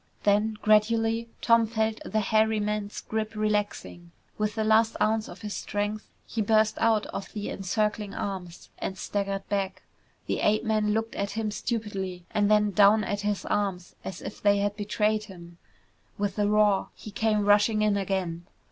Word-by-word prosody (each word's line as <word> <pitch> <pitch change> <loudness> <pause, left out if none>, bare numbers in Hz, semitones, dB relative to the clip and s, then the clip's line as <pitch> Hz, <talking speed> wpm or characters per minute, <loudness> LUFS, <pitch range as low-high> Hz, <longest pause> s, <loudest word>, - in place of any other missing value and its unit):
Then, 210 +1 +2
gradually, 225 +2 +3
Tom 230 -1 +5
felt 220 0 -1
the 215 - -1
hairy 220 +1 +2
man's 210 0 -3
grip 220 0 -3
relaxing. 210 -5 -2 0.3
With 210 0 -1
the 220 - 0
last 220 +1 +3
ounce 220 0 +1
of - - -11
his 210 -2 -5
strength 205 +1 -3 0.2
he 225 - -3
burst 215 +1 +2
out 220 -2 +3
of 195 - -5
the 210 -2 -4
encircling 210 +1 -1
arms 185 -4 -5
and 190 - -4
staggered 195 -1 -3
back. 195 -2 -2 0.4
The - - -1
ape 215 +1 +2
man 215 -2 +1
looked 225 0 -2
at 200 0 -3
him 220 -1 -2
stupidly 195 -6 -4
and 205 -1 +2
then 210 -1 +4
down 210 +2 +5
at 205 +1 -2
his 205 -1 -2
arms 195 -3 -2
as 190 - -7
if - - -7
they 205 0 +4
had 205 0 0
betrayed 215 +1 0
him. 175 -3 -13 0.6
With 200 0 -2
a 205 - +3
roar, 210 -2 +3
he 215 - -10
came 210 0 +1
rushing 210 +1 +4
in 210 -1 +3
again. 185 -3 -2
210 Hz, 170 wpm, -27 LUFS, 200-220 Hz, 0.6 s, Tom